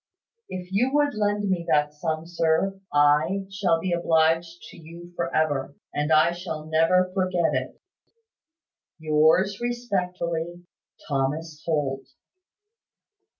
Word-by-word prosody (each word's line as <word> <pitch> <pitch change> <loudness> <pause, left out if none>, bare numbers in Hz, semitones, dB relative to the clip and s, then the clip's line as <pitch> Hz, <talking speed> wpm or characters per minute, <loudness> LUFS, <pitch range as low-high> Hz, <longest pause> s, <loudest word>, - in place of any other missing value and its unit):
If 180 -1 -6
you 240 +7 +1
would 290 -1 +2
lend 205 -1 0
me 185 -3 0
that 150 0 +2
sum, 155 +1 -3
sir, 170 +3 0
I 150 +7 +3
shall 195 -4 +1
be 185 +2 -3
obliged 165 0 +1
to - - -14
you 170 +2 -12
for 170 -1 -2
ever, 145 -3 0 0.2
and 150 +1 -1
I 155 +2 +5
shall 170 -3 -6
never 165 +4 +2
forget 185 -3 +1
it. - - -3 1.2
"Yours 160 +6 +2
respectfully, 180 -8 -3 0.4
"Thomas 150 +3 -2
Holt." 140 -4 -1
170 Hz, 115 wpm, -25 LUFS, 155-185 Hz, 1.2 s, I